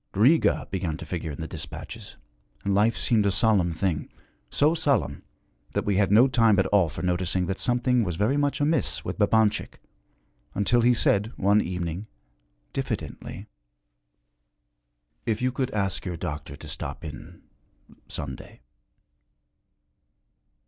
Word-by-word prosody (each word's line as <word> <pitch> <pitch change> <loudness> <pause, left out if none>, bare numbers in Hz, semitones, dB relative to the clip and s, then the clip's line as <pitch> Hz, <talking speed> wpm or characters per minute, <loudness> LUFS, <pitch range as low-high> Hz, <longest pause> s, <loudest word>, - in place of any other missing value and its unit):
Riga 130 +11 +4
began 85 -5 -2
to 85 - -8
figure 80 0 -4
in 75 +1 -6
the 80 - -4
dispatches, 80 0 -8 0.5
and 100 - +1
life 105 +4 +3
seemed 110 -4 +2
a - - +3
solemn 100 -5 +3
thing 80 -2 -1 0.4
so 150 +3 +3
solemn 130 - +1 0.5
that - - -1
we 100 -2 +1
had 100 -1 +2
no 115 +6 +7
time 115 -5 +4
at 95 - +3
all 95 -5 +3
for 75 - -7
noticing 90 0 0
that 95 +1 -3
something 125 0 +2
was 90 -4 -2
very 105 - +1
much 145 +1 +1
amiss 150 +1 0
with - - -4
Babanchik, 105 0 +2 0.8
until 115 +4 +3
he 120 +1 +4
said 105 0 +2
one 100 +2 +4
evening, 90 +2 -4 0.7
diffidently, 110 - -4 1.8
'If 110 -2 +1
you 130 0 +1
could 130 +1 -1
ask 100 -5 -1
your 90 -2 -4
doctor 75 -2 -5
to - - -11
stop - - -6
in - - -10 0.6
some 70 -2 -5
day.' - - -14
100 Hz, 140 wpm, -26 LUFS, 90-120 Hz, 1.8 s, no